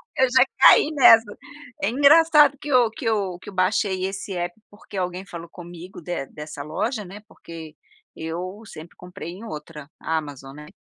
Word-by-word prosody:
Eu 260 - +3
já 260 0 +5
caí 290 +3 +7
nessa, 235 -6 +7 0.6
é 200 - +1
engraçado 295 +2 +5
que - - -8
eu 250 -4 +3
que 225 - -10
eu 200 -6 -1
que - - -11
eu 200 - -11
baixei 185 0 0
esse 195 +1 -6
app, 175 +4 -5
porque 205 0 -15
alguém 180 0 -3
falou 170 -3 -9
comigo 175 +1 -11
de 175 -6 -4
dessa 150 0 -9
loja, 210 - -3
né, 195 +3 -11
porque 165 -6 -12 0.4
eu 180 +5 -6
sempre 160 -4 -12
comprei 180 -2 -10
em 190 +5 -11
outra, 150 -6 -9
Amazon, 145 -4 -5
né, 150 0 -11
185 Hz, 170 wpm, -23 LUFS, 165-225 Hz, 0.6 s, caí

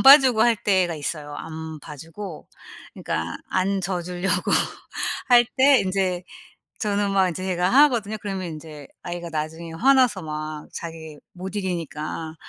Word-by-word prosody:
안 - - +2
봐주고 270 -5 +8
할 235 -2 +4
때가 185 -4 +2
있어요. 150 -1 -4
안 160 -1 -7
봐주고 165 +5 -9 0.5
그니까 80 +1 -3
안 190 +1 +1
져 180 -1 -1
주려고 180 +2 -1 0.8
할 240 -1 +7
때 275 0 +7
인제 185 -2 0 0.6
저는 205 -2 0
막 190 -1 +3
인제 180 +2 -5
제가 180 -1 +1
하거든요? 240 -5 +4
그러면 195 -3 -3
인제 150 -2 -10 0.2
아이가 175 -1 -5
나중에 160 +1 -4
화나서 250 0 +4
막 155 0 -5
자기 160 -2 -7 0.2
못 190 +2 -7
이기니까 165 -4 -4
180 Hz, 285 characters per minute, -24 LUFS, 160-200 Hz, 0.8 s, 봐주고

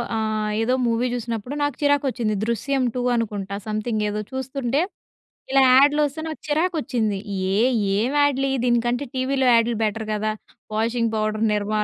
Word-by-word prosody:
ఆహ్, 215 -1 -1
ఏదో 245 +3 +1
మూవీ 235 +2 +1
చూసినప్పుడు 235 +2 -4
నాకు 290 -3 -1
చిరాకు 285 -1 +2
వచ్చింది. 220 -3 -1
'దృశ్యం 255 +4 0
టూ' 250 0 -1
అనుకుంటా 205 -4 -3
సమ్‌థింగ్ 215 0 -1
ఏదో 210 +1 -3
చూస్తుంటే, 265 +1 -1 0.7
ఇలా 270 0 +5
యాడ్‌లు 290 +3 +5
వస్తే 290 +3 -6
నాకు 310 - -6
చిరాకు 325 +5 +1
వచ్చింది. 220 -8 -1 0.4
ఏహ్! 240 +5 +3 0.3
ఏం 230 +5 +1
యాడ్‌లు 275 -1 +2
ఇయి 270 - 0
దీనికంటే, 240 +3 +1
టీవీలో 260 0 +1
యాడ్‌లు 230 0 +3
బెటర్ 215 +1 -2
కదా! 215 +1 -1 0.4
Washing 230 +1 0
powder 215 0 0
Nirma 210 +1 -2
240 Hz, 155 wpm, -23 LUFS, 215-270 Hz, 0.7 s, ఇలా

